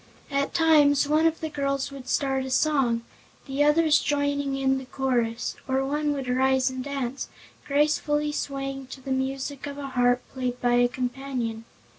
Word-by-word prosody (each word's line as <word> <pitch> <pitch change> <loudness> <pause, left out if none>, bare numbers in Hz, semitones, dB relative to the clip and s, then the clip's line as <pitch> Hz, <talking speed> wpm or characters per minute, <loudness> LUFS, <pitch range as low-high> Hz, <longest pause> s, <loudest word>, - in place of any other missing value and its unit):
At 280 0 -1
times 295 -4 +5
one 310 +2 +4
of 325 0 -1
the 315 - -2
girls 275 -2 -2
would 270 -2 -9
start 270 -2 +1
a 265 - -5
song, 260 -4 +2 0.4
the 275 +1 0
others 300 0 +4
joining 285 -1 0
in 265 0 +1
the 265 - -10
chorus, 245 -3 -1
or 265 0 +1
one 295 +2 0
would 270 -3 -4
rise 260 +1 +2
and 260 0 -5
dance, 275 -2 -4 0.4
gracefully 295 +1 +1
swaying 275 -2 -4
to 265 +1 -10
the 270 - -6
music 270 +1 -2
of 285 0 -6
a 280 -1 -5
harp 245 -1 +2
played 250 -2 -3
by 245 0 +2
a 245 0 +5
companion. 245 -2 -4
270 Hz, 170 wpm, -26 LUFS, 260-285 Hz, 0.4 s, times